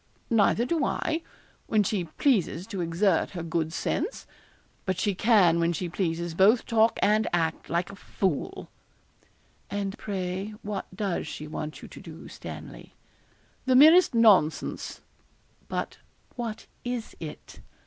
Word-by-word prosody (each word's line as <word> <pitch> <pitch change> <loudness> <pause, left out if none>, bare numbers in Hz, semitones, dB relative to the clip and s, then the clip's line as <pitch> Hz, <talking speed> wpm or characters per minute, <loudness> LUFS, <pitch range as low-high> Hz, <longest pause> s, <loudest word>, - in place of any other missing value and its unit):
'Neither 225 +1 +3
do 320 +2 0
I 320 +4 -1 0.5
when 215 -1 +3
she 195 -3 -1
pleases 185 - +1
to 200 -4 -4
exert 170 +2 +1
her 170 - -3
good 165 -1 -1
sense 335 - -2 0.6
but 185 -2 -2
she 205 +1 +1
can, 185 -5 +4
when 170 +1 +2
she 180 +2 -3
pleases, 170 -2 -2
both 205 +7 +4
talk 225 0 +3
and 215 +1 +3
act 165 -2 -1
like 175 +3 -1
a - - -10
fool.' 190 -5 -3 1.0
'And 200 -1 -3
pray, 195 +1 -4
what 200 -2 -4
does 190 -5 -2
she 150 - -6
want 155 0 -6
you - - -8
to - - -11
do, - - -10
Stanley?' - - -10 0.7
'The 260 - +4
merest 315 +2 +7
nonsense.' 200 -9 +3 0.7
'But - - -4 0.4
what 230 -3 -5 0.2
is 245 -2 -4
it?' 155 -2 -9
195 Hz, 140 wpm, -27 LUFS, 170-225 Hz, 1.0 s, merest